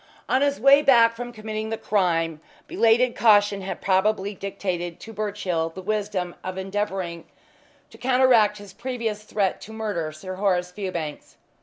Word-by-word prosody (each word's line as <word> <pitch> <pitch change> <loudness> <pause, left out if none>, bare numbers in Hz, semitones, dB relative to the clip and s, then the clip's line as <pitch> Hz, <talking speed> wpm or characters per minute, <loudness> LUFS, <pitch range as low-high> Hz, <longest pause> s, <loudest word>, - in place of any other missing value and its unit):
On 260 - +2
his 285 0 +1
way 275 +4 +7
back 235 -5 +5
from 245 +1 -6
committing 215 -1 -5
the 225 - -2
crime 165 -7 0 0.2
belated 240 -6 +3
caution 205 -3 +4
had 190 - -5
probably 200 +1 +1
dictated 180 -3 -4
to 225 - -9
Birchill 200 -6 -2
the 185 +3 -9
wisdom 200 -3 -2
of 185 0 -5
endeavouring 190 -3 -3 0.7
to - - -15
counteract 250 -5 +4
his 205 -2 -12
previous 230 -3 -4
threat 205 -3 -1
to 220 - -10
murder 210 -8 -3
Sir 185 +5 -8
Horace 180 -3 0
Fewbanks. 180 -6 -5
205 Hz, 150 wpm, -24 LUFS, 185-225 Hz, 0.7 s, way